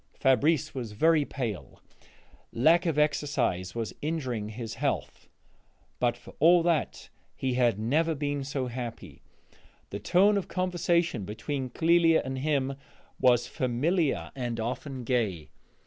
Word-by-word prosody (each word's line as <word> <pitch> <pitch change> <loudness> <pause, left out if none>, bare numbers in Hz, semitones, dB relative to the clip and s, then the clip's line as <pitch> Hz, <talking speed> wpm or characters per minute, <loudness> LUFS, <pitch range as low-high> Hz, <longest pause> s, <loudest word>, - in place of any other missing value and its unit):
Fabrice 135 +3 +2
was 120 -5 -5
very 160 +6 +3
pale; 120 -10 -5 0.7
lack 165 +8 +3
of 160 -3 0
exercise 145 -12 0
was 115 -2 -3
injuring 130 -9 -3
his 110 0 -6
health: 135 +4 -3 0.7
but 120 -1 +1
for - - -14
all 170 +2 +6
that 165 -4 -1 0.3
he 130 -1 -2
had 120 -4 +2
never 155 +9 +1
been 145 -1 -2
so 135 -1 -3
happy. 120 -1 -7 0.7
The 100 - -4
tone 195 - +4
of 195 - -3
the - - -15
conversation 175 - 0
between 130 +7 -4
Clélia 165 +3 +3
and 130 0 -4
him 140 -2 0 0.4
was 125 -2 +4
familiar 140 +6 0
and 120 -3 -3
often 130 +3 -4
gay. 110 - -1
135 Hz, 130 wpm, -28 LUFS, 120-160 Hz, 0.7 s, all